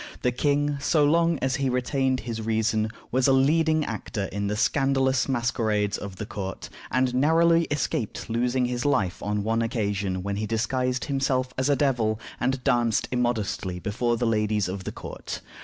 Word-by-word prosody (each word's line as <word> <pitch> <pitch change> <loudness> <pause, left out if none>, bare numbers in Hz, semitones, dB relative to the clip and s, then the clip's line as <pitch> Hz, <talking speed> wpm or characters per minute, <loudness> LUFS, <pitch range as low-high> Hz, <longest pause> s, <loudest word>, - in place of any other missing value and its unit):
The 125 - +3
king, 145 +3 +1
so 150 +1 +3
long 165 +2 +3
as 130 -1 +1
he 135 -1 0
retained 130 +1 0
his 115 -2 -4
reason, 110 0 0 0.2
was 130 +1 +3
a - - +5
leading 155 +3 +3
actor 105 - -4
in 100 +1 -2
the 105 - -1
scandalous 135 +2 +2
masquerades 110 -5 0
of 100 -2 -6
the 105 - -5
court, 95 -3 -6 0.2
and 130 0 +1
narrowly 165 +5 +4
escaped 140 -7 -2
losing 125 +2 +1
his 120 0 -2
life 95 -11 +1
on 105 0 -1
one 115 +2 +1
occasion 100 -5 -1
when 100 0 -2
he 105 +1 -2
disguised 125 +3 -1
himself 135 -2 0
as 130 +2 0
a 145 - +4
devil, 120 -7 +1 0.2
and 130 +1 -1
danced 120 -3 +2
immodestly 115 -7 -1
before 115 +6 -1
the 120 - 0
ladies 105 -3 +1
of 95 0 -5
the - - -3
court. - - -7
125 Hz, 175 wpm, -26 LUFS, 110-135 Hz, 0.2 s, a